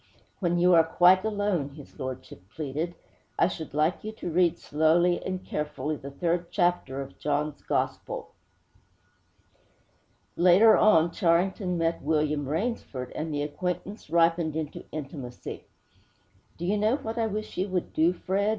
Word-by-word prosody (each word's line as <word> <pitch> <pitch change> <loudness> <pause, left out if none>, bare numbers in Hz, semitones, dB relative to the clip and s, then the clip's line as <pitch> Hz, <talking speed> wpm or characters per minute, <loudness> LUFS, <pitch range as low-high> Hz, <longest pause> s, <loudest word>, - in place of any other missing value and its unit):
'When 175 -2 +1
you 180 +1 +5
are 165 -1 +7
quite 180 +3 +5
alone,' 205 -10 -1
his 145 -3 -13
lordship 130 -7 -6
pleaded, 155 +7 -4 0.4
'I - - +4
should 160 -5 -7
like 155 +4 +1
you 215 - -4
to 175 -5 -5
read 175 0 +3
slowly 165 +4 +2
and 185 0 -4
carefully 150 0 -3
the 140 -1 -8
third 170 +4 -1
chapter 175 -6 0
of 135 - -14
John's 150 0 -1
Gospel!' - - -3 2.0
Later 185 +6 +6
on, 170 -6 +5
Charrington 180 +1 +1
met 165 0 0
William 150 -1 0
Rainsford, 160 - -3
and 155 +1 -4
the 145 -1 -1
acquaintance 180 +7 -4
ripened 165 -2 +2
into 155 -2 -5
intimacy. 135 -4 -7 0.9
'Do 175 - -4
you 205 +3 +1
know 215 +4 +3
what 235 -5 -5
I 225 - +2
wish 215 0 -5
you 185 +2 0
would 185 -2 -3
do, 160 +2 +4
Fred?' 195 +3 -1
170 Hz, 145 wpm, -27 LUFS, 150-185 Hz, 2.0 s, are